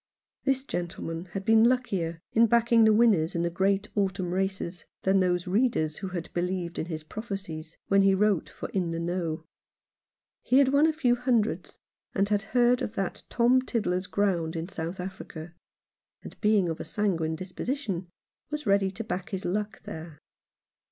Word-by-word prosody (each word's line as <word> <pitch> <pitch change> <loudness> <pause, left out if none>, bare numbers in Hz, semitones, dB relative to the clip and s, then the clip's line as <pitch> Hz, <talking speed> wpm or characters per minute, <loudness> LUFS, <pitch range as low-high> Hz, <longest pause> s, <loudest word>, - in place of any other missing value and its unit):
This 270 -1 +2
gentleman 170 -6 -4
had 195 -1 -4
been 225 0 +6
luckier 185 -10 -1
in 230 +1 +5
backing 235 0 +5
the 220 - +6
winners 210 -8 +4
in 170 - +1
the 170 - 0
great 195 +3 +1
autumn 190 -3 -1
races 190 -2 -2 0.2
than 190 +1 +4
those 180 -1 +1
readers 190 -6 +1
who 195 - -5
had 175 -3 -5
believed 175 -1 -2
in 160 - -2
his 160 -3 -5
prophecies 175 -5 -6
when 195 0 +4
he 195 0 +5
wrote 195 -6 +2
for - - -7
In 180 -3 -1
the 165 - -3
Know. 170 -2 -2 1.0
He 255 - +3
had 275 -1 +6
won 285 +3 +5
a - - +3
few 255 -6 +2
hundreds, 240 -3 0 0.4
and 200 0 +2
had 205 -1 +2 0.2
heard 245 0 +4
of 215 - -3
that 195 -4 -2
Tom 245 +2 +4
Tiddler's 195 -7 -1
Ground 180 -5 0
in 165 +1 -3
South 170 0 -5
Africa; 175 -3 -7 0.7
and, - - -11
being 210 -4 +3
of 165 -1 -3
a - - -4
sanguine 170 -7 -1
disposition, 190 - -4 0.4
was 300 -1 -4
ready 200 -1 +3
to 205 +4 -6
back 185 -4 -4
his 190 -2 -4
luck 210 +4 -2
there. 160 -1 -8
195 Hz, 170 wpm, -28 LUFS, 170-220 Hz, 1.0 s, been